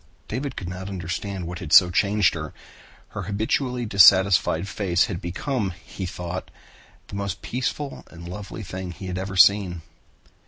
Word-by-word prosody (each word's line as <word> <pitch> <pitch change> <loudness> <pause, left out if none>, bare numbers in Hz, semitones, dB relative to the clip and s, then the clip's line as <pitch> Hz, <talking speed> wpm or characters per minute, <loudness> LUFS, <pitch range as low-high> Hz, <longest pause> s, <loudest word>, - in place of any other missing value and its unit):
David 130 +3 -4
could 90 - -6
not 95 +2 -6
understand 95 +1 -4
what 85 0 -6
had 80 -4 -7
so 90 +1 +8
changed 100 +1 +3
her. 80 -2 -6 0.5
Her 100 - -6
habitually 110 +6 -1
dissatisfied 95 -3 +5
face 95 -3 +1
had 95 -8 -5
become, 95 - -2
he 95 - -6
thought, 90 +1 -6 0.6
the - - -7
most 100 -1 -4
peaceful 135 +3 -3
and 85 0 -11
lovely 105 +4 -7
thing 95 -1 -6
he 95 +4 -9
had 90 0 -3
ever 95 +1 -5
seen. 95 -3 +4
95 Hz, 155 wpm, -24 LUFS, 90-105 Hz, 0.6 s, so